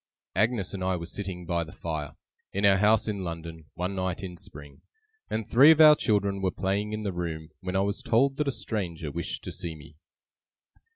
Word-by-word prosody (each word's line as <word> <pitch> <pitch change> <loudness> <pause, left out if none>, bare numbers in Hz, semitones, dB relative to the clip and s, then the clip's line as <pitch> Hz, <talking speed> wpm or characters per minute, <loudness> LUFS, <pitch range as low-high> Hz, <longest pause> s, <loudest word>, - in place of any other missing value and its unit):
Agnes 105 -1 +1
and 95 -2 -4
I 95 0 +1
were 85 -1 -5
sitting 90 -1 -5
by 85 0 0
the 80 - -11
fire, 80 -5 -5 0.4
in 100 +1 +1
our 100 -1 +6
house 105 +3 +3
in 100 -3 -2
London, 85 -2 -6
one 90 +3 -2
night 95 -1 -2
in 90 -2 -6
spring, 75 -4 -12 0.5
and 110 0 -2
three 135 +6 +7
of 160 -1 +6
our 155 -1 +9
children 100 -6 0
were 95 - +2
playing 100 +3 -1
in 110 0 -3
the 100 -3 -2
room, 80 -3 -4
when 95 -1 -4
I 95 - +3
was 100 +1 -1
told 135 +4 +2
that 150 - 0
a - - +2
stranger 90 - -4
wished - - -4
to - - -5
see 85 -2 -5
me. 75 0 -14
95 Hz, 210 wpm, -27 LUFS, 85-105 Hz, 0.5 s, our